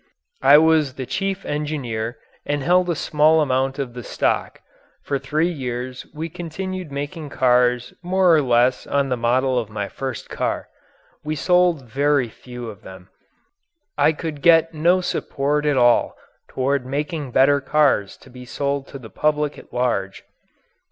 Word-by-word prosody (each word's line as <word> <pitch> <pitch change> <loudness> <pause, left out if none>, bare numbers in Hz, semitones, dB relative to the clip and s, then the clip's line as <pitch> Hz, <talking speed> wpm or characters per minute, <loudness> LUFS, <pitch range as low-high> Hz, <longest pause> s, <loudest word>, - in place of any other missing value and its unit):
I 145 - +8
was 155 -4 +3
the 130 - -5
chief 195 +9 -3
engineer 130 -7 -3 0.3
and 145 -1 -2
held 180 +3 +3
a 170 - +1
small 155 +1 +3
amount 135 -2 0
of 135 -4 -4
the 125 - -7
stock. - - -1 0.4
For 140 - -2
three 155 +6 0
years 125 -3 -5
we 160 +2 -5
continued 180 +1 -6
making 145 +2 -5
cars 125 -1 +2
more 180 -1 +3
or 155 - +4
less 125 -1 +2
on 140 -1 0
the 125 - +1
model 125 +2 +1
of 110 -3 -5
my 105 -2 -4
first 135 -1 -6
car. - - -3 0.5
We 155 +1 -3
sold 180 -3 +2
very 140 +1 +1
few 125 +1 -9
of 105 -2 -9
them; 95 -3 -13 0.9
I - - +4
could 155 -2 -6
get 165 0 +5
no 170 +4 +3
support 150 -3 -1
at 145 -2 +2
all 120 -1 +3 0.3
toward 135 +1 -1
making 145 +2 -3
better 140 +3 +4
cars 135 -8 +1
to 130 - -16
be 125 0 -11
sold 140 +2 -3
to - - -9
the 115 -5 -12
public 150 -1 0
at - - -17
large. 110 -6 -2
140 Hz, 160 wpm, -21 LUFS, 125-155 Hz, 0.9 s, I